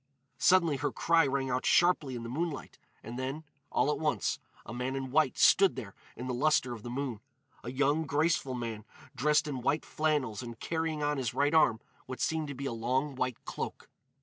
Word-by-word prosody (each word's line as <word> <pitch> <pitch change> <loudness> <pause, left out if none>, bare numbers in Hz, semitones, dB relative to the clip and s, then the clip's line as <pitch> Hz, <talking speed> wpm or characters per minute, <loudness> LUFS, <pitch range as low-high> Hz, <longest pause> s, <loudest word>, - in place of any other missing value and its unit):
Suddenly 170 -6 +4
her 145 +2 -1
cry 165 -3 +3
rang 135 -1 -1
out 125 +1 0
sharply 165 -7 +3
in 120 - -5
the - - -5
moonlight, 150 +5 -4 0.2
and 120 +3 -6
then, 135 +4 -3 0.3
all 150 - +2
at - - -2
once, 155 -2 0 0.3
a 105 - -7
man 125 +2 -2
in 135 -1 -4
white 150 -2 +2
stood 195 -1 +5
there 100 -3 -7 0.2
in 125 - -6
the 130 - -2
lustre 130 -1 +2
of 115 - -8
the 120 - -7
moon—a 125 -2 -7
young, 145 +4 +1
graceful 145 -3 +1
man 115 -3 -4 0.3
dressed 150 +4 +2
in 135 -4 -3
white 145 +5 0
flannels 145 -8 0
and 120 -2 -8
carrying 160 -2 -2
on 145 0 +1
his 125 -4 -2
right 145 +2 +2
arm 115 -9 +4 0.3
what 130 0 -6
seemed 160 -1 0
to 140 - -6
be 140 +2 -5
a 135 - -2
long 130 +5 -1
white 125 -2 -3
cloak. - - -6
135 Hz, 200 wpm, -31 LUFS, 125-150 Hz, 0.3 s, stood